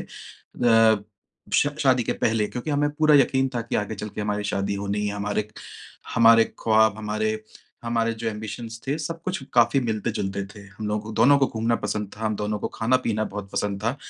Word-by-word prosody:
अ, 115 -3 +1 0.5
श 145 - +4
शादी 130 -3 +4
के - - 0
पहले 110 -2 0
क्योंकि 125 +7 -5
हमें 145 0 +2
पूरा 155 0 +3
यकीन 135 -1 +3
था 120 - 0
कि 115 - -2
आगे 105 +1 -2
चल 105 +1 -6
के 105 - -7
हमारी 105 0 -2
शादी 100 0 -1
होनी 100 +1 -2
है, 100 - -2
हमारे 105 +1 -2 0.7
हमारे 115 0 +7
ख्वाब, 110 -2 +3
हमारे, 110 0 -2 0.4
हमारे 115 -1 0
जो 115 0 -3
ऐम्बिशन्स 110 +2 -6
थे, 145 +4 -1
सब 165 +2 -5
कुछ 185 -4 -3
काफ़ी 120 +3 +4
मिलते-जुलते 105 -4 -2
थे। 100 - -11 0.2
हम 105 - -4
लोग 105 0 -1
को 110 0 -8
दोनों 125 +6 +5
को 135 - +3
घूमना 115 0 0
पसंद 105 -2 -2
था। 110 - -6
हम 110 -1 0
दोनों 105 0 -2
को - - -3
खाना-पीना 115 -2 +1
बहुत 100 -1 -7
पसंद 100 -1 -2
था 115 +5 0
110 Hz, 195 wpm, -24 LUFS, 105-120 Hz, 0.7 s, हमारे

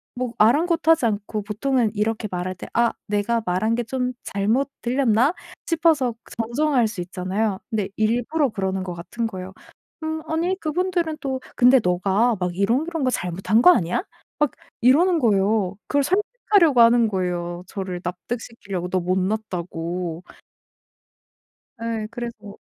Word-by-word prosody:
뭐 250 -1 -3
아랑곳하지 320 +5 +4
않고 210 -1 -2
보통은 230 +2 0
이렇게 215 +1 -1
말할 180 +1 -3
때 175 - -9
'아 235 0 +3 0.2
내가 210 +3 0
말한 185 +6 +1
게 240 - -1
좀 250 +1 -2
잘못 220 +8 0
들렸나?' 250 +2 +2 0.3
싶어서 315 -8 +2 0.2
정정할 245 +2 +2
수 210 -4 -5
있잖아요. 190 +3 -2
근데 215 -5 -1
일부러 245 +7 +1
그러는 190 -3 -2
것 180 -1 -5
같은 225 +7 -4
거예요. 190 -2 -7 0.5
"음 315 0 -2
아니 335 +4 0
그분들은 340 -1 -1
또 265 -2 -2 0.2
근데 250 +2 +6
네가 195 +6 +2
막 180 -1 -2
이런 230 +10 +2
이런 330 -4 -2
거 255 - +3
잘못한 190 +3 +1
거 310 - +8
아니야?" 180 - +1 0.4
막 295 -2 +2 0.3
이러는 325 +8 +5
거예요. 200 -4 +2
그걸 285 -1 +2
설득하려고 375 - +3
하는 230 0 +6
거예요, 180 -3 -2
저를 185 -3 -5
납득시키려고 190 0 -5
너 185 - +1
못 180 +1 0
났다고. 180 -4 -3 1.6
예. 225 -2 -2
그래서 225 -4 -7
225 Hz, 305 characters per minute, -23 LUFS, 190-265 Hz, 1.6 s, 거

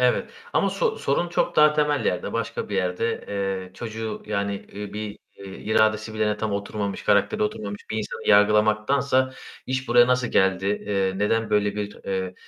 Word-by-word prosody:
Evet 125 -1 +2 0.2
ama - - +2
so - - 0
sorun 155 +5 0
çok 175 - 0
daha 150 0 +7
temel 150 -1 +1
yerde, 90 - -1
başka 115 -1 -3
bir 100 - -2
yerde, 95 +5 -1
eee, 95 -2 -3
çocuğu 110 0 -5
yani, 100 -1 -1 0.2
ııı, 105 -1 -6
bir, 105 -1 -5 0.2
eee, 100 - -11
iradesi 110 0 +1
bile 105 -1 +1
tam 110 -1 -2
oturmamış, 100 0 -3
karakteri - - +2
oturmamış 105 -1 -3
bir 110 - -2
insanı 105 - -5
yargılamaktansa 110 +6 +3 0.3
"İş 130 -1 -2
buraya 120 0 +6
nasıl 125 -1 +1
geldi, 95 0 +2
eee, 100 -2 0
neden 115 +2 +1
böyle 105 -1 +1
bir, 105 0 -5
eee, 95 -1 -2
105 Hz, 170 wpm, -24 LUFS, 100-115 Hz, 0.3 s, daha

